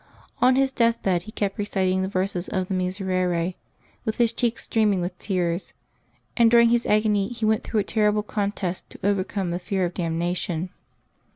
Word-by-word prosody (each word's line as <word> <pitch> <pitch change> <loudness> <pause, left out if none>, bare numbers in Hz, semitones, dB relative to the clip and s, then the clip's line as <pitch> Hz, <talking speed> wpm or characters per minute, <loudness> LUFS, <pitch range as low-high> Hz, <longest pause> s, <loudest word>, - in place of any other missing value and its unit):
On 255 +1 +5
his 270 0 +2
death 230 -2 +2
bed 180 -3 +2
he - - -8
kept 200 -2 -2
reciting 190 -2 0
the 190 - -1
verses 185 -1 -2
of 185 -2 -1
the - - -1
Miserere, 185 -2 0 0.5
with 220 - -2
his 235 -1 +3
cheeks 235 0 -1
streaming 210 -4 +2
with 175 +1 -3
tears; 180 -2 -2 0.6
and 235 -2 +5
during 235 0 +6
his 240 0 +2
agony 210 -2 +2
he 235 -2 -3
went 220 0 +2
through 215 - 0
a - - -2
terrible 210 0 +1
contest 200 -3 -3
to - - -13
overcome 195 -2 0
the 175 - -2
fear 190 0 -1
of 175 - -3
damnation. 175 0 -2
195 Hz, 180 wpm, -24 LUFS, 185-220 Hz, 0.6 s, during